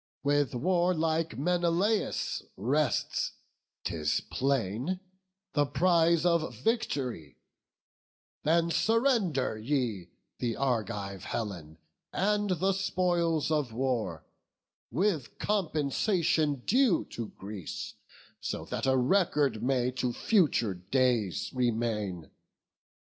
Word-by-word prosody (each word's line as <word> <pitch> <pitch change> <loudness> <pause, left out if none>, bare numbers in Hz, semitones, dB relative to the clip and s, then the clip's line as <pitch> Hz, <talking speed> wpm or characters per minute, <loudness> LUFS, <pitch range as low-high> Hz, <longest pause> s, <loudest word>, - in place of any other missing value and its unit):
With 145 -1 +2
warlike 165 +1 +1
Menelaus 175 +7 +1 0.2
rests, 135 +7 0 0.5
'tis 75 -3 0
plain, 135 - 0 0.5
The 145 -1 +2
prize 170 +1 +3
of 170 -2 +2
vict'ry: 135 - -2 1.0
then 165 +2 +2
surrender 180 - +2
ye 115 -7 -1 0.3
The 115 -2 -1
Argive 105 -7 -2
Helen 90 -9 -4 0.3
and 205 +1 +1
the 185 +2 +2
spoils 175 -5 +1
of 145 -7 0
war, 110 -11 -1 0.6
With 160 - -1
compensation 155 - +1
due 245 -6 +3
to 115 -2 -4
Greece, 100 -4 -6 0.6
that - - -4
so 135 - +3
A 130 - +3
record 140 - +2
may 125 0 +1
to 125 -1 -2
future 155 - +2
days 105 - 0
remain." 110 - -1
140 Hz, 90 wpm, -30 LUFS, 115-175 Hz, 1.0 s, prize